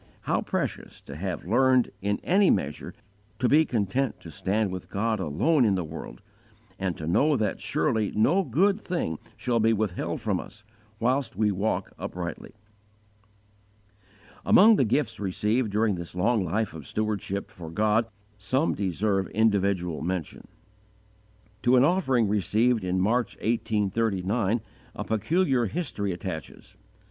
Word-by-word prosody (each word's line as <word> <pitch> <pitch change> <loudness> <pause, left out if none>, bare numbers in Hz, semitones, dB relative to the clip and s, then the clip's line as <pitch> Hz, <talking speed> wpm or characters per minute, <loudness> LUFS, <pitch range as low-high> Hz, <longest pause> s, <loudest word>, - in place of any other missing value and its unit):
_ - - -28 0.2
How - - 0
precious - - -4
to 70 - -10
have 90 +2 -4
learned, 130 +5 +3
in 100 +1 -1
any 195 +1 +4
measure, 75 -6 -1 0.4
to 125 - +1
be 155 +5 +5
content 120 +3 -1
to 80 - -10
stand 100 +6 -1
with 95 -1 -7
God 110 +2 -1
alone 105 - +2
in 105 -4 +3
the 90 - -1
world, 80 -6 -9 0.6
and 95 -3 -2
to 80 - -6
know 140 - +3
that 105 -4 -1
surely 120 -8 0
no 165 - +3
good 190 - +2
thing 125 - -3 0.2
shall 120 -2 0
be 115 +1 +3
withheld 105 -4 -2
from - - -1
us, 105 +1 -11 0.4
whilst 130 +1 0
we 105 +1 +2
walk 100 +3 -1
uprightly!" 85 -2 -6 1.9
Among 220 +3 +7
the 135 - +3
gifts 115 -1 0
received 105 +4 0
during 105 +1 +1
this 85 -1 -7
long 110 +3 +2
life 100 +5 -1
of 75 -4 -9
stewardship 105 -2 -3
for 85 -2 -9
God 110 +6 +1 0.3
some 130 +9 +1
deserve 95 0 0
individual 100 -6 +1
mention. 90 -1 -4 1.1
To 125 +1 +4
an 125 - +6
offering 135 - +2
received 110 +3 +1
in 90 0 0
March, 115 +4 +1
1839, 110 -1 0 0.3
a - - -4
peculiar 125 - +1
history 105 - -3
attaches. 85 -3 -7
105 Hz, 140 wpm, -26 LUFS, 95-125 Hz, 1.9 s, Among